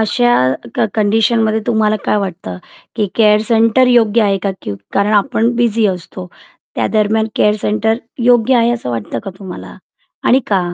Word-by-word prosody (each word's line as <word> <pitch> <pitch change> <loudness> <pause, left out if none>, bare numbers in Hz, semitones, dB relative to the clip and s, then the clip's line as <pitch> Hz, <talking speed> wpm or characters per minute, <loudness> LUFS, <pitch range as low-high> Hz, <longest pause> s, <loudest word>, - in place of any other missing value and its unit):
अशा 240 +3 +1 0.4
क - - +1
कंडिशनमध्ये 220 +1 +1
तुम्हाला 215 -2 +1
काय - - +1
वाटतं 170 - -5 0.4
की 210 -2 0
केअर 210 -2 +4
सेंटर 230 +2 +3
योग्य 230 -2 +3
आहे 195 -1 +1
का 200 - 0
की 100 - -5 0.2
कारण 200 +2 +1
आपण 235 +2 +1
बिझी 230 -2 +1
असतो, 180 0 -5 0.5
त्यादरम्यान 220 0 0
केअर 210 0 +3
सेंटर 220 +1 0 0.3
योग्य 245 +1 +3
आहे 235 0 +2
असं 230 - -4
वाटतं 115 -3 -4
का 195 - -5
तुम्हाला 190 -3 -9 0.5
आणि 260 - +4
का? 195 -3 +1
215 Hz, 155 wpm, -15 LUFS, 200-230 Hz, 0.5 s, केअर